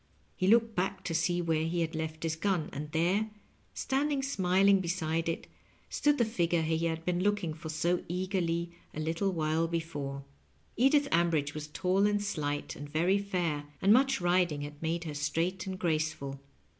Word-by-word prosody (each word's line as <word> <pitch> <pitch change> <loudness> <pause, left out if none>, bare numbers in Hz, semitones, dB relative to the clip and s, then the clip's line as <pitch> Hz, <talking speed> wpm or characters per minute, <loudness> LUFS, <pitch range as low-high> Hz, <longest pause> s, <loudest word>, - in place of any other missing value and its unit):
He 185 - 0
looked 225 +1 +5
back 190 +1 -1
to 165 - -3
see 175 +2 +1
where 160 -1 +1
he 170 +1 0
had 165 0 -1
left 160 0 -4
his 160 -1 0
gun, 180 -2 -1
and 150 +2 -5
there, 185 +7 +1 0.5
standing 275 +1 0
smiling 195 -5 +3
beside 165 -2 -1
it, 165 - -3 0.5
stood 295 0 +2
the 235 - +3
figure 175 -6 +1
he 160 0 0
bad 165 0 -3
been 180 0 0
looking 200 -5 +1
for 160 0 -8
so 170 +3 +1
eagerly 175 -2 -1 0.2
a - - -4
little 165 +5 0
while 160 -1 +1
before. 145 -5 -4 0.5
Edith 275 +4 +4
Ambridge 165 -4 +2
was 150 0 -5
tall 185 +6 +2
and 205 0 +1
slight, 145 -7 -2
and 145 +1 -8
very 175 +6 +2
fair, 175 -7 -1
and 200 +2 +5
much 270 +1 +4
riding 175 -4 +2
had 145 0 -8
made 165 +1 -1
her 155 -3 -5
straight 165 +6 -1
and 190 -1 -3
graceful. 155 -5 -1
170 Hz, 175 wpm, -31 LUFS, 160-190 Hz, 0.5 s, looked